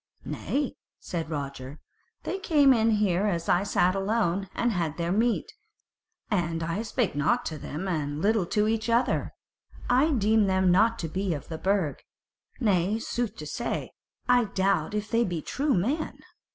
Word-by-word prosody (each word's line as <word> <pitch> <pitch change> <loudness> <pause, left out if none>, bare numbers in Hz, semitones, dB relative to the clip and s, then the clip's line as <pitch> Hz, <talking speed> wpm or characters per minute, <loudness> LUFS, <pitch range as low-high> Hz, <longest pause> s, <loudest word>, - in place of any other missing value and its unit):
"Nay," 285 -1 -2 0.3
said 165 -3 -4
Roger, 140 -2 -5 0.4
"they 385 - -3
came 290 -7 +5
in 225 -1 +3
here 205 -2 +2
as 170 -4 -1
I 175 - +3
sat 185 -2 +2
alone, 195 -2 0
and 240 - +1
had 165 -6 -2
their 170 0 -1
meat, 235 - +1 0.8
and 170 -4 0 0.2
spake 230 -6 0
nought 145 +1 +1
to 155 -2 -4
me, - - -8 0.2
and 150 -4 -2
little 205 0 +2
to 210 +3 +1
each 225 +1 -1
other. 235 +2 +1 0.6
I 265 +6 +4
deem 220 -6 +3
them 190 -1 +3
not 225 +5 +4
to - - -2
be 185 +1 -1
of 145 - -9
the 160 -1 -5
Burg. 190 -7 0 0.6
Nay, 200 -2 +2
sooth 230 -1 -3
to 155 - -8
say, 150 +10 -3 0.4
I 245 -1 +4
doubt 195 -3 0
if 210 0 -3
they 230 0 +3
be 175 -6 -2
true 280 - 0
men." 270 - -1
200 Hz, 165 wpm, -27 LUFS, 170-230 Hz, 0.8 s, came